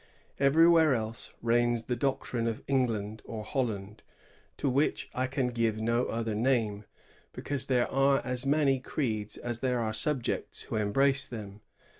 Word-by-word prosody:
Everywhere 160 +1 +5
else 110 -1 -5
reigns 120 0 +2
the 125 - -2
doctrine 120 -2 -1
of 115 -1 -3
England 115 -6 0
or 110 -2 -6
Holland, 105 -5 -3 0.6
to - - -1
which 140 +3 0
I 130 0 0
can 130 -1 -1
give 115 -2 0
no 115 +2 +1
other 115 -1 -2
name, 110 -3 0 0.5
because 140 -2 -3
there 125 -2 +2
are 135 +1 +3
as 125 0 -1
many 140 -1 +2
creeds 110 -6 -3
as 120 -1 -4
there 125 -1 0
are 110 -2 -1
subjects 135 +1 -1
who - - -5
embrace 135 +7 +2
them. 105 -3 -8
120 Hz, 150 wpm, -29 LUFS, 110-135 Hz, 0.6 s, Everywhere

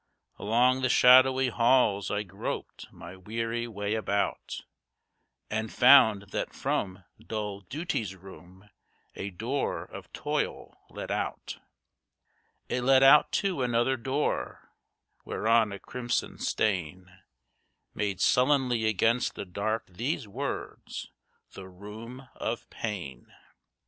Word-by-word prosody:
Along 125 +5 +2
the 130 - +1
shadowy 130 +1 +6
halls 115 -5 +3
I 105 0 -1
groped 90 - -6
my 85 +2 -11
weary 115 +5 -3
way 105 -2 -3
about, 100 -2 -2 0.9
And 110 0 -3
found 110 -6 +6
that - - -3
from 95 -1 -2 0.2
dull 105 -3 -5
Duty's 110 - -4
room, 95 +1 -15 0.5
a 100 - -5
door 115 +9 -2
of - - -11
Toil - - -3
led - - -7
out. - - -4 1.1
It 125 - -1
led 135 +1 +5
out 135 +2 +7
to 185 -8 -1
another 120 +1 +1
door, 130 +4 -3 0.5
whereon 115 -1 +2
a 100 - -5
crimson 120 +2 -3
stain 90 -2 -2 0.7
Made 100 -3 -2
sullenly 125 0 +3
against 115 +4 +1
the - - -5
dark 105 +4 -2
these 115 - -3
words: 130 +8 -6 0.4
"The 95 -1 -9
Room 110 +7 -10
of - - -4
Pain." 85 - -6
110 Hz, 110 wpm, -28 LUFS, 100-125 Hz, 1.1 s, out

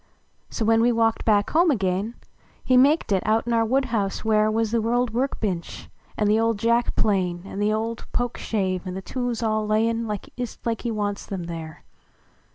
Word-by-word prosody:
So 225 - -2
when 225 +1 +4
we 240 +1 +4
walked 225 -1 +1
1)ack 205 -2 +2
home 340 +2 +4
again, 200 -2 0 0.5
lie 255 - +4
maked 275 0 +4
it, 190 -2 +3
out 220 +2 +1
in 240 - -1
our 230 0 +3
woodhuuse 225 -5 0
where 215 -1 +3
\Yux 220 0 0
tlie 230 0 +1
old 245 -2 0
workliench, 215 -8 -3 0.3
an 210 - +1
the 215 +2 +3
old 225 -1 +1
jack 235 +3 +1
plane. 180 -4 0
An 195 - -7
the 205 +1 +2
old 225 +2 -3
pokeshave, 200 -6 -2
an 180 - -4
the 190 - -6
tools 245 -1 -3
all 215 -1 0
lay 215 +1 +2
n 230 0 -1
1st 220 +3 -5
like 230 -1 -1
he 240 - -2
wants 205 -2 -3
em 190 -3 -3
there. 165 -2 -7
220 Hz, 190 wpm, -24 LUFS, 205-230 Hz, 0.5 s, when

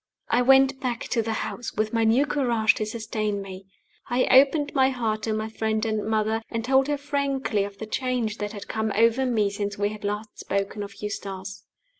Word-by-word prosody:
I 245 - +3
went 270 +1 +5
back 245 -3 -2
to 235 - +1
the 225 0 -3
house, 240 - -6
with 215 +1 -1
my 230 -1 +2
new 240 +6 +4
courage 240 -7 +2
to 215 - -3
sustain 215 -2 -2
me. 190 -1 -9 0.4
I 245 +2 +2
opened 285 +2 +5
my 265 -2 +4
heart 225 -4 -1
to 220 0 -1
my 215 0 -2
friend 220 0 -1
and 215 -2 -1
mother, 220 +1 0
and 230 -1 -3
told 265 +1 +3
her 295 -1 0
frankly 275 -6 -1
of 200 0 -9
the 220 - -6
change 240 -2 -2
that 210 0 -3
had 205 -3 -8
come 220 -1 -1
over 230 +4 +3
me 215 -5 +1
since 200 0 -3
we 205 0 +1
had 215 0 -9
last 210 +1 -4
spoken 200 +2 -2
of 200 0 -7
Eustace. 195 -2 -6
220 Hz, 205 wpm, -25 LUFS, 210-255 Hz, 0.4 s, went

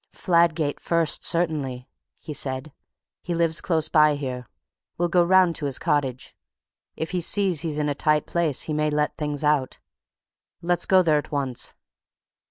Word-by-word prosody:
"Fladgate 170 -4 +1
first, 165 -2 +1
certainly," 150 -7 -1 0.3
he 150 - -8
said. 135 +1 -4 0.5
"He 175 - -3
lives 165 -1 +1
close 160 -4 +1
by 150 -2 +4
here; 130 -4 -5 0.5
we'll 175 0 0
go 175 0 +4
round 180 -1 +4
to 150 - -4
his 135 - +1
cottage. 135 -4 -2 0.6
If 160 - -4
he 180 -1 -1
sees 185 -3 +1
he's 160 -3 -3
in 150 -1 0
a 145 - 0
tight 150 +1 +1
place 165 -5 0
he 155 - -4
may 150 0 0
let 150 0 -1
things 150 -1 -4
out. 150 -3 +1 0.8
Let's 175 0 0
go 185 -1 +5
there 155 -3 +3
at - - -9
once." 135 -4 -2
155 Hz, 165 wpm, -24 LUFS, 145-170 Hz, 0.8 s, go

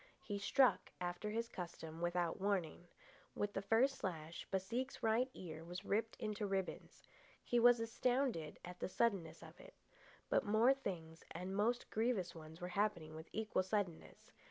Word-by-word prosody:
He 205 -1 -3
struck, 255 +6 +4
after 180 +4 -2
his 230 +2 -1
custom, 170 -5 -6
without 175 0 0
warning. 185 -4 0 0.5
With 205 0 -1
the 195 - -1
first 230 +7 +3
slash, 165 -3 -4
Baseek's 230 +8 -2
right 230 +4 +3
ear 160 -3 -7
was 180 +4 -7
ripped 220 +2 0
into 210 -1 -2
ribbons. 195 -1 -3 0.4
He 240 - +2
was 245 0 +7
astounded 230 - 0
at 180 0 -8
the - - -2
suddenness 185 -7 0
of - - -12
it. - - -13 0.5
But - - +3
more 220 +5 +5
things, 165 -11 -5
and 185 +2 -4
most 235 +4 +1
grievous 215 -6 +1
ones, 160 0 -10
were 180 -1 -4
happening 175 -5 0
with 160 +1 -9
equal 215 -3 0
suddenness. 185 -3 -3
195 Hz, 155 wpm, -39 LUFS, 175-225 Hz, 0.5 s, was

